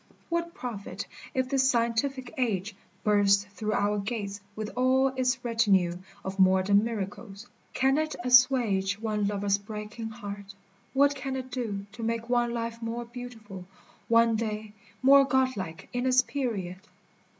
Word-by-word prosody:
What 340 +1 -2
profit 200 - -6 0.3
if 260 0 +1
this 265 -1 +2
scientific 245 +2 0
age 215 - -1 0.3
Burst 200 -1 +4
through 215 +1 -3
our 205 0 +1
gates 200 -1 -4
with 215 -1 -4
all 260 +1 +3
its 255 -1 -1
retinue 195 -7 +2 0.3
Of 190 +1 -5
modern 190 +2 +5
miracles! 205 -1 -5 0.3
Can 270 +3 +3
it 310 0 -2
assuage 245 -6 +4
One 210 -2 -1
lover's 200 0 0
breaking 215 +2 -6
heart? 200 -2 -8 0.4
what 285 +1 +4
can 270 -1 -4
it 260 -1 -5
do 215 -6 -3
To 230 - -10
make 230 +1 -2
one 240 -1 +2
life 230 0 -4
more 230 +1 -4
beautiful, 225 -6 -9 0.4
one 230 0 +4
day 215 -1 -3 0.3
More 275 +1 +8
godlike 255 - -1
in 245 +1 0
its 255 0 +5
period 210 -10 -3
230 Hz, 140 wpm, -28 LUFS, 200-255 Hz, 0.4 s, More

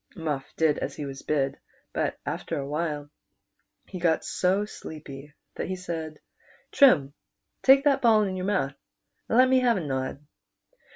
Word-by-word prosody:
Muff 150 -6 -4
did 160 -2 +2
as - - -4
he 150 - -5
was 135 -1 -7
bid; 140 -2 -1 0.3
but - - -1
after - - -3
a 140 - -3
while 150 0 -3 0.7
he 185 - -8
got 165 -2 +1
so 190 +3 +1
sleepy 150 -7 -10 0.2
that - - -4
he 185 - -2
said, 165 -4 -6 0.5
"Trim, 150 - +5 0.5
take 270 +1 +6
that 280 -2 +3
ball 220 -3 +5
in 190 -2 -2
your 185 0 -3
mouth, 185 -10 0 0.6
and 230 - +2
let 255 +1 +7
me 260 0 +4
have 240 -4 +3
a - - -2
nod." 135 +1 -3
160 Hz, 165 wpm, -26 LUFS, 145-205 Hz, 0.7 s, let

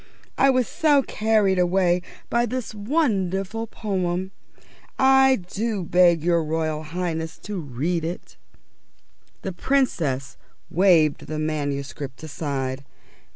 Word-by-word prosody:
I 275 - +4
was 255 -2 +2
so 290 -3 +3
carried 215 -5 +2
away 180 0 +2 0.3
by 240 0 +1
this 250 -1 -4
wonderful 210 - -1
poem. 190 -4 -2 0.7
I 265 0 +5
do 210 -1 -2
beg 175 -1 +4
of - - -11
your 170 -1 +2
Royal 155 0 -1
Highness 160 0 -4
to 205 -2 -4
read 155 +4 -2
it." 170 +2 -6 1.1
The 190 - -3
Princess 170 - 0 0.3
waved 165 -5 +3
the 155 - -4
manuscript 145 -2 -3
aside. 140 -3 -3
180 Hz, 110 wpm, -24 LUFS, 155-215 Hz, 1.1 s, I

